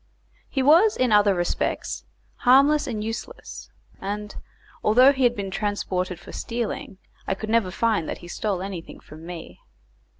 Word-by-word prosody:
He 270 Hz, -, 0 dB
was 340 Hz, +10 st, +5 dB
in 255 Hz, -2 st, +2 dB
other 205 Hz, -2 st, +5 dB
respects 175 Hz, -1 st, -2 dB, 0.3 s
harmless 280 Hz, +4 st, +5 dB
and 215 Hz, -4 st, -3 dB
useless, 225 Hz, -, -7 dB, 0.3 s
and, 210 Hz, +1 st, -5 dB, 0.5 s
although 250 Hz, +6 st, +6 dB
he 265 Hz, -2 st, +2 dB
had 240 Hz, 0 st, +3 dB
been 195 Hz, -3 st, -4 dB
transported 185 Hz, -3 st, -2 dB
for -, -, -12 dB
stealing, 230 Hz, -4 st, -4 dB, 0.3 s
I 190 Hz, -, 0 dB
could 215 Hz, +2 st, -5 dB
never 225 Hz, -5 st, +3 dB
find 210 Hz, -3 st, 0 dB
that -, -, -3 dB
he 175 Hz, -, -12 dB
stole 190 Hz, +1 st, -2 dB
anything 190 Hz, -4 st, -7 dB
from 160 Hz, +2 st, -13 dB
me. 175 Hz, -2 st, -9 dB
210 Hz, 155 wpm, -24 LUFS, 190-245 Hz, 0.5 s, although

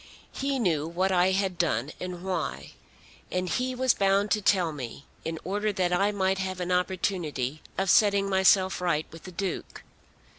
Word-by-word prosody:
He 275 Hz, 0 st, -1 dB
knew 165 Hz, -, +1 dB
what 185 Hz, +3 st, 0 dB
I 180 Hz, 0 st, +4 dB
had 190 Hz, -2 st, 0 dB
done 150 Hz, -5 st, 0 dB
and 180 Hz, -1 st, -6 dB
why, 190 Hz, -1 st, -3 dB, 0.6 s
and 180 Hz, 0 st, -1 dB
he 255 Hz, +6 st, -1 dB
was 260 Hz, -1 st, +3 dB
bound 200 Hz, +1 st, +2 dB
to 210 Hz, -, +2 dB
tell 185 Hz, -4 st, +3 dB
me 135 Hz, -1 st, -7 dB, 0.2 s
in 165 Hz, 0 st, -3 dB
order 205 Hz, +4 st, -1 dB
that 180 Hz, -2 st, 0 dB
I 200 Hz, +3 st, +2 dB
might 190 Hz, -1 st, 0 dB
have 190 Hz, -1 st, -3 dB
an 180 Hz, 0 st, -2 dB
opportunity 175 Hz, -6 st, -1 dB, 0.2 s
of 195 Hz, -, 0 dB
setting 200 Hz, 0 st, +4 dB
myself 190 Hz, -1 st, +3 dB
right 160 Hz, -4 st, +1 dB
with 165 Hz, -1 st, -12 dB
the 185 Hz, -, -8 dB
Duke. 185 Hz, +1 st, -4 dB
185 Hz, 175 wpm, -27 LUFS, 175-195 Hz, 0.6 s, I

